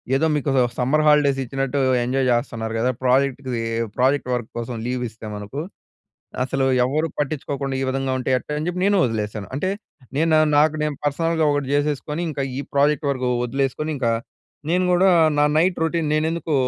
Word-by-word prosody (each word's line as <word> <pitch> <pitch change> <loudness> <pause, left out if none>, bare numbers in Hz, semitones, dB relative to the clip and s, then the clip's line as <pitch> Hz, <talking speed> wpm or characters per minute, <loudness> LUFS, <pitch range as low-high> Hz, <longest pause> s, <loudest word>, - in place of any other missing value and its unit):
ఏదో 160 +4 +2
మీకు 145 -1 -1 0.3
summer 140 +5 +2
holidays 145 -2 +4
ఇచ్చినట్టు 135 +2 -2 0.3
ఎంజాయ్ 130 +1 0
జేస్తున్నారు 115 -1 -2
గదా! 125 +3 +2
ప్రాజెక్ట్‌కి 130 -2 +1 0.3
ప్రాజెక్ట్ 130 +1 +2
వర్క్ 120 -2 -5
కోసం 120 +1 -5
లీవ్ 125 0 -2
ఇస్తే 110 0 -12
మనకు. 105 +8 -5 0.8
అసలు 135 0 0 0.2
ఎవరూ 155 +5 0
పట్టించుకోకుండా 140 -2 -2
ఈ - - 0
విధంగా 135 0 -1
ఉంటే, 125 - -3
ఎట్టా 150 - -6
అని 155 - -3
జెప్పి 180 +1 -3
నేను 205 - +3
వదిలేసాను. 105 -3 -3
అంటే, 170 +7 -1 0.5
నేను 160 +1 +2 0.2
నాకు 150 +1 +4
నేను 150 -1 -2
పర్సనల్‌గా 160 +2 +1
ఒకటి 145 -2 -1
జేసేసుకొని, 150 +2 -1
ఇంకా 145 -2 -3 0.2
ఈ - - -2
ప్రాజెక్ట్ 145 +1 +2
వరకు 130 -2 -1 0.2
వదిలేసుకొని 135 +4 -2
ఇంకా 120 -3 +1 0.6
నేను 180 +3 +2
గూడా 180 +2 +4 0.3
నా 145 - +4
నైట్ 175 +3 +3
రొటీన్ 165 -1 0
నేనెందుకూ 160 +1 0
140 Hz, 160 wpm, -22 LUFS, 125-155 Hz, 0.8 s, holidays